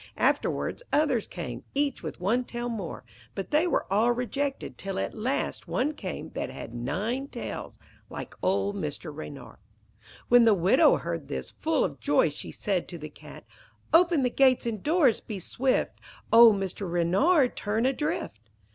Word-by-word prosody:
Afterwards -, -, 0 dB
others 280 Hz, -7 st, +2 dB
came, -, -, -6 dB
each 285 Hz, -1 st, 0 dB
with -, -, -6 dB
one 225 Hz, +8 st, +1 dB
tail 240 Hz, 0 st, -4 dB
more; 205 Hz, -8 st, -5 dB, 0.3 s
but 195 Hz, -, -5 dB
they 310 Hz, +4 st, +3 dB
were -, -, +1 dB
all 225 Hz, +4 st, +4 dB
rejected, 270 Hz, +3 st, -2 dB
till 195 Hz, -1 st, -5 dB
at -, -, -2 dB
last 245 Hz, +5 st, -2 dB
one 290 Hz, +5 st, 0 dB
came 300 Hz, -, -6 dB
that -, -, -4 dB
had 115 Hz, -, -8 dB
nine 210 Hz, -, -2 dB
tails -, -, -6 dB, 0.3 s
like -, -, -7 dB
old 200 Hz, +2 st, +1 dB
Mr. 150 Hz, -3 st, -5 dB
Reynard. 145 Hz, -2 st, -9 dB, 0.7 s
When 245 Hz, 0 st, +7 dB
the 225 Hz, -2 st, +5 dB
widow 210 Hz, -, +5 dB
heard 165 Hz, -3 st, -4 dB
this, 65 Hz, -1 st, -5 dB
full -, -, 0 dB
of -, -, -3 dB
joy, 145 Hz, +2 st, +3 dB
she 145 Hz, -, -7 dB
said 190 Hz, -4 st, -2 dB
to 175 Hz, -, -7 dB
the 155 Hz, -1 st, -8 dB
Cat -, -, -13 dB, 0.5 s
'Open 335 Hz, -3 st, +5 dB
the 250 Hz, -, +1 dB
gates 260 Hz, -2 st, +4 dB
and 220 Hz, -4 st, -3 dB
doors; 300 Hz, -, +3 dB
be 215 Hz, -, -6 dB
swift. 255 Hz, +8 st, -1 dB, 0.3 s
Old 230 Hz, -2 st, +9 dB
Mr. 195 Hz, -1 st, -4 dB
Reynard 245 Hz, -, +3 dB
turn 220 Hz, +3 st, -1 dB
adrift.' 295 Hz, -, -1 dB
230 Hz, 165 wpm, -27 LUFS, 185-270 Hz, 0.7 s, Old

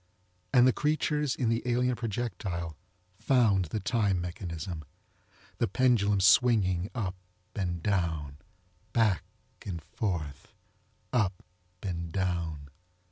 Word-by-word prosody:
And 125 Hz, -2 st, +6 dB
the 130 Hz, -, +5 dB
creatures 150 Hz, -2 st, +1 dB
in 120 Hz, -4 st, 0 dB
the 115 Hz, 0 st, +1 dB
alien 125 Hz, +1 st, +1 dB
projectile 100 Hz, -8 st, -3 dB, 0.4 s
found 110 Hz, -8 st, +3 dB
the 95 Hz, +7 st, -3 dB
time 100 Hz, -2 st, +1 dB
mechanism, 85 Hz, -2 st, -5 dB, 0.8 s
the -, -, +2 dB
pendulum 105 Hz, -3 st, +3 dB
swinging 100 Hz, -5 st, +4 dB
up 100 Hz, -7 st, -1 dB, 0.4 s
and 85 Hz, -4 st, -2 dB
down, 80 Hz, -8 st, -1 dB, 0.6 s
back 105 Hz, -7 st, +3 dB, 0.4 s
and 95 Hz, -6 st, -4 dB
forth, 80 Hz, -3 st, -4 dB, 0.7 s
up 100 Hz, -7 st, +1 dB, 0.4 s
and 85 Hz, -4 st, -3 dB
down. 85 Hz, -6 st, -2 dB
95 Hz, 105 wpm, -29 LUFS, 85-120 Hz, 0.8 s, And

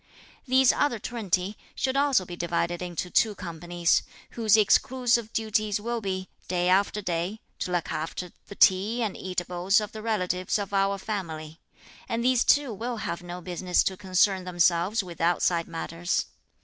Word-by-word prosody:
These 260 Hz, 0 st, +5 dB
other 290 Hz, -5 st, +1 dB
twenty 205 Hz, -3 st, -2 dB, 0.2 s
should 265 Hz, 0 st, -1 dB
also 275 Hz, -8 st, +3 dB
be 175 Hz, -, -7 dB
divided 175 Hz, 0 st, -1 dB
into 180 Hz, 0 st, -4 dB
two 215 Hz, -2 st, +3 dB
companies, 175 Hz, -1 st, 0 dB, 0.3 s
whose 220 Hz, -2 st, +3 dB
exclusive 235 Hz, +1 st, +2 dB
duties 215 Hz, -2 st, 0 dB
will 235 Hz, +2 st, -3 dB
be, 185 Hz, -2 st, -3 dB, 0.2 s
day 180 Hz, 0 st, +1 dB
after 200 Hz, +2 st, +2 dB
day, 180 Hz, +4 st, -2 dB, 0.2 s
to 180 Hz, -, -3 dB
look 175 Hz, -2 st, -1 dB
after 165 Hz, +3 st, -4 dB, 0.2 s
the 200 Hz, -, -9 dB
tea 205 Hz, +7 st, +4 dB
and 210 Hz, -4 st, -2 dB
eatables 180 Hz, +2 st, 0 dB
of 210 Hz, 0 st, -5 dB
the 215 Hz, -, -8 dB
relatives 185 Hz, -5 st, 0 dB
of 200 Hz, -1 st, -5 dB
our 195 Hz, 0 st, +2 dB
family; 165 Hz, -6 st, -5 dB, 0.5 s
and 230 Hz, +1 st, -1 dB
these 255 Hz, -1 st, +4 dB
too 285 Hz, -5 st, +3 dB
will 235 Hz, +4 st, -4 dB
have 170 Hz, -, -3 dB
no 175 Hz, 0 st, -7 dB
business 180 Hz, 0 st, +1 dB
to 190 Hz, -, -1 dB
concern 190 Hz, 0 st, +2 dB
themselves 180 Hz, +3 st, +2 dB
with 175 Hz, -3 st, -9 dB
outside 170 Hz, 0 st, +2 dB
matters. 165 Hz, +1 st, -2 dB
190 Hz, 160 wpm, -27 LUFS, 175-220 Hz, 0.5 s, These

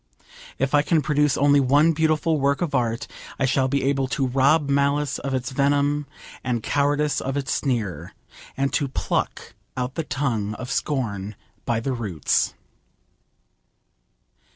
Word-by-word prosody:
If 135 Hz, +1 st, -1 dB
I 145 Hz, -, +6 dB
can 155 Hz, 0 st, +1 dB
produce 150 Hz, -1 st, +2 dB
only 145 Hz, +1 st, +4 dB
one 145 Hz, +5 st, +4 dB
beautiful 155 Hz, 0 st, +1 dB
work 140 Hz, +4 st, +1 dB
of 160 Hz, -, -3 dB
art 115 Hz, -3 st, 0 dB, 0.3 s
I 135 Hz, -, +1 dB
shall 130 Hz, 0 st, +2 dB
be 140 Hz, +1 st, 0 dB
able 135 Hz, -1 st, +1 dB
to 135 Hz, +1 st, -1 dB
rob 140 Hz, +4 st, +3 dB
malice 140 Hz, +1 st, +1 dB
of 135 Hz, -1 st, -2 dB
its 125 Hz, -1 st, -3 dB
venom, 145 Hz, +1 st, +1 dB, 0.4 s
and 120 Hz, -3 st, -1 dB
cowardice 145 Hz, +1 st, +1 dB
of 135 Hz, +1 st, -3 dB
its 135 Hz, -1 st, -2 dB
sneer, 105 Hz, -, -2 dB, 0.4 s
and 140 Hz, 0 st, 0 dB
to 145 Hz, -, +1 dB
pluck 130 Hz, -, -2 dB, 0.2 s
out 125 Hz, 0 st, -2 dB
the 165 Hz, -, -2 dB
tongue 115 Hz, -8 st, -2 dB
of 125 Hz, +3 st, -6 dB
scorn 105 Hz, -7 st, -2 dB, 0.3 s
by 120 Hz, -1 st, 0 dB
the 130 Hz, +3 st, -2 dB
roots. 100 Hz, -, 0 dB
140 Hz, 150 wpm, -23 LUFS, 125-145 Hz, 0.4 s, I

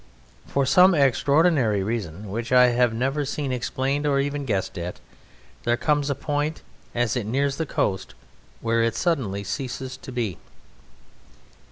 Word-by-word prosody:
For 140 Hz, -1 st, +1 dB
some 180 Hz, +6 st, +6 dB
extraordinary 140 Hz, -, +3 dB
reason, 100 Hz, -3 st, -4 dB
which 115 Hz, +3 st, -4 dB
I 125 Hz, -1 st, +7 dB
have 120 Hz, 0 st, +3 dB
never 135 Hz, +6 st, -1 dB
seen 140 Hz, -1 st, -3 dB
explained 130 Hz, +4 st, -1 dB
or 140 Hz, -1 st, +2 dB
even 145 Hz, 0 st, -2 dB
guessed 100 Hz, -6 st, -1 dB
at, 85 Hz, +1 st, -5 dB, 0.6 s
there 120 Hz, 0 st, +1 dB
comes 145 Hz, +2 st, +1 dB
a 140 Hz, -, 0 dB
point 145 Hz, +2 st, -2 dB, 0.3 s
as 120 Hz, -2 st, +1 dB
it 115 Hz, -4 st, -2 dB
nears 140 Hz, +4 st, 0 dB
the 160 Hz, -, -2 dB
coast 95 Hz, -6 st, -1 dB, 0.5 s
where 115 Hz, 0 st, +1 dB
it 115 Hz, 0 st, +1 dB
suddenly 115 Hz, -, -1 dB
ceases 130 Hz, +5 st, -4 dB
to -, -, -10 dB
be. 115 Hz, -8 st, -3 dB
130 Hz, 150 wpm, -24 LUFS, 115-145 Hz, 0.6 s, I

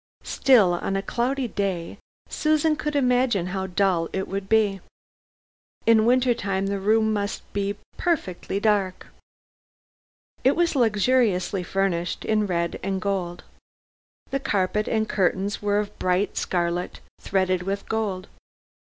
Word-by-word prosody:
Still, 220 Hz, -10 st, +4 dB
on 185 Hz, +2 st, -2 dB
a 195 Hz, -, -1 dB
cloudy 255 Hz, +3 st, -1 dB
day, 195 Hz, -6 st, -3 dB, 0.3 s
Susan 310 Hz, 0 st, +1 dB
could 300 Hz, -1 st, -3 dB
imagine 250 Hz, -8 st, +2 dB
how 190 Hz, -1 st, -2 dB
dull 180 Hz, -3 st, +1 dB
it 190 Hz, -, -3 dB
would 195 Hz, 0 st, -4 dB
be. 210 Hz, -3 st, +2 dB, 1.0 s
In 225 Hz, -1 st, +5 dB
winter 250 Hz, 0 st, +4 dB
time 195 Hz, -3 st, -2 dB
the 200 Hz, 0 st, -1 dB
room 220 Hz, +2 st, +2 dB
must 205 Hz, -1 st, -2 dB
be 200 Hz, 0 st, -1 dB, 0.2 s
perfectly 200 Hz, -, -1 dB
dark. 205 Hz, -3 st, 0 dB, 1.4 s
It 265 Hz, -, +4 dB
was 340 Hz, -2 st, +1 dB
luxuriously 215 Hz, -5 st, +2 dB
furnished, 180 Hz, -2 st, -1 dB
in 215 Hz, -1 st, +1 dB
red 170 Hz, -2 st, -1 dB
and 195 Hz, 0 st, -2 dB
gold. 185 Hz, -4 st, -3 dB, 0.9 s
The 275 Hz, -, 0 dB
carpet 210 Hz, -4 st, 0 dB
and 220 Hz, -1 st, 0 dB
curtains 195 Hz, +1 st, 0 dB
were 205 Hz, 0 st, +1 dB
of 210 Hz, -1 st, -3 dB
bright 185 Hz, +2 st, 0 dB
scarlet, 175 Hz, 0 st, -2 dB, 0.2 s
threaded 185 Hz, -2 st, 0 dB
with 195 Hz, +2 st, -4 dB
gold. 205 Hz, -4 st, -2 dB
200 Hz, 130 wpm, -24 LUFS, 185-225 Hz, 1.4 s, In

